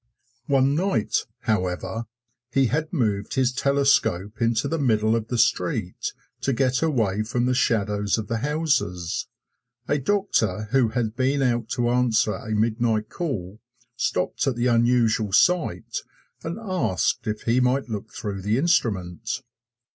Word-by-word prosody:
One 135 Hz, 0 st, +3 dB
night, 175 Hz, -, 0 dB, 0.3 s
however, 95 Hz, +1 st, -1 dB, 0.5 s
he 135 Hz, 0 st, +3 dB
had 155 Hz, +6 st, -1 dB
moved 105 Hz, -, -1 dB
his 130 Hz, -1 st, +2 dB
telescope 135 Hz, -8 st, +1 dB
into 115 Hz, -1 st, +2 dB
the 165 Hz, -, -1 dB
middle 110 Hz, -4 st, +2 dB
of 110 Hz, -1 st, -2 dB
the 120 Hz, -, -2 dB
street 115 Hz, -, 0 dB, 0.3 s
to 135 Hz, -, 0 dB
get 130 Hz, +1 st, +1 dB
away 115 Hz, -11 st, +1 dB
from 120 Hz, +3 st, -1 dB
the 125 Hz, -, +2 dB
shadows 105 Hz, -4 st, +1 dB
of 110 Hz, -2 st, -4 dB
the 115 Hz, -, -1 dB
houses. 140 Hz, -, -1 dB, 0.6 s
A 145 Hz, -, +1 dB
doctor 130 Hz, -, 0 dB
who 130 Hz, -3 st, +4 dB
had 115 Hz, -2 st, -2 dB
been 135 Hz, +2 st, +1 dB
out 120 Hz, -3 st, 0 dB
to 120 Hz, -1 st, +1 dB
answer 120 Hz, -3 st, +2 dB
a 110 Hz, -, -7 dB
midnight 110 Hz, 0 st, +1 dB
call 110 Hz, -, -4 dB, 0.4 s
stopped 130 Hz, -, -1 dB
at 135 Hz, -, +1 dB
the 120 Hz, +1 st, -1 dB
unusual 115 Hz, -3 st, +3 dB
sight 180 Hz, -, +2 dB, 0.4 s
and 165 Hz, +4 st, -4 dB
asked 180 Hz, -, -1 dB
if 105 Hz, 0 st, -3 dB
he 120 Hz, +2 st, +2 dB
might 130 Hz, +2 st, +1 dB
look 110 Hz, -1 st, -5 dB
through 100 Hz, -3 st, -5 dB
the 105 Hz, +4 st, +1 dB
instrument. 115 Hz, -, 0 dB
120 Hz, 145 wpm, -24 LUFS, 110-135 Hz, 0.6 s, who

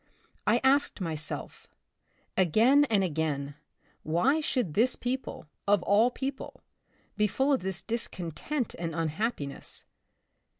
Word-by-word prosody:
I 240 Hz, -, +4 dB
asked 275 Hz, +2 st, +3 dB
myself, 155 Hz, -4 st, -4 dB, 0.7 s
again 225 Hz, -, +5 dB
and 215 Hz, -7 st, +2 dB
again, 150 Hz, -4 st, -2 dB, 0.5 s
why 240 Hz, -, +2 dB
should 250 Hz, -, -1 dB
this 240 Hz, +7 st, +3 dB
people, 255 Hz, -5 st, -4 dB, 0.2 s
of 200 Hz, -3 st, +3 dB
all 215 Hz, +4 st, +4 dB
peo 265 Hz, +2 st, -3 dB
ple, 270 Hz, -, -11 dB, 0.6 s
be 210 Hz, 0 st, +3 dB
full 270 Hz, +7 st, +1 dB
of 265 Hz, -, +1 dB
this 190 Hz, 0 st, -3 dB
discontent 230 Hz, -, -1 dB
and 165 Hz, -2 st, -3 dB
unhappi 165 Hz, +2 st, -1 dB
ness -, -, -8 dB
205 Hz, 125 wpm, -29 LUFS, 165-255 Hz, 0.7 s, again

